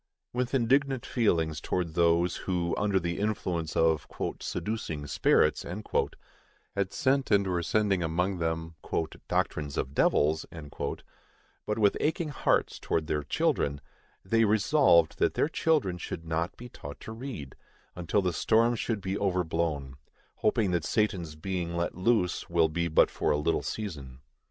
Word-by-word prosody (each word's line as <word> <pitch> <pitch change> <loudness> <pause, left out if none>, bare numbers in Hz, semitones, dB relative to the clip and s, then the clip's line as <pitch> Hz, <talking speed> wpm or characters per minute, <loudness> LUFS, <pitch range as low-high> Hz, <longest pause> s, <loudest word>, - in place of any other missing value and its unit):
With 125 +2 -1
indignant 135 +1 +2
feelings 80 - +1
towards 90 -3 -2
those, 85 +1 +3
who, 85 -2 -1
under 100 -2 +1
the 85 +1 -3
influence 90 -6 -2
of 80 -2 +2 0.3
"seducing 85 -9 -3
spirits," 75 +2 +3 1.1
had 100 -1 -1
sent 135 -1 +1
and 100 -2 +4
were 90 -2 0
sending 100 0 +1
among 90 +3 0
them 80 0 -2 0.5
"doctrines 75 -2 -1
of 65 - -2
devils," 75 +2 +3 1.2
but 105 - -1
with 105 -2 +3
aching 160 +1 0
hearts 145 - +1
towards 80 - -1
their 75 0 -1
children, 70 0 0 0.5
they 115 +4 +3
resolved 105 - +4
that - - +2
their - - +2
children 150 - +1
should 80 - -6
not 80 +1 -2
be 120 - -9
taught 70 -11 -10
to - - -7
read, 110 - -7 0.4
until 90 +3 0
the 90 -1 0
storm 115 +7 +3
should 110 -2 -2
be 95 +1 -2
overblown; 80 -7 -1 0.4
hoping 105 -3 +1
that 85 -3 0
Satan's 90 -8 0
being 85 0 -3
let 85 - -1
loose 90 -1 +1
will 85 -2 +3
be 85 +2 -1
but 80 - +4
for - - -1
a 75 - +3
little 75 +2 +1
season. 70 -12 -6
90 Hz, 145 wpm, -29 LUFS, 80-110 Hz, 1.2 s, and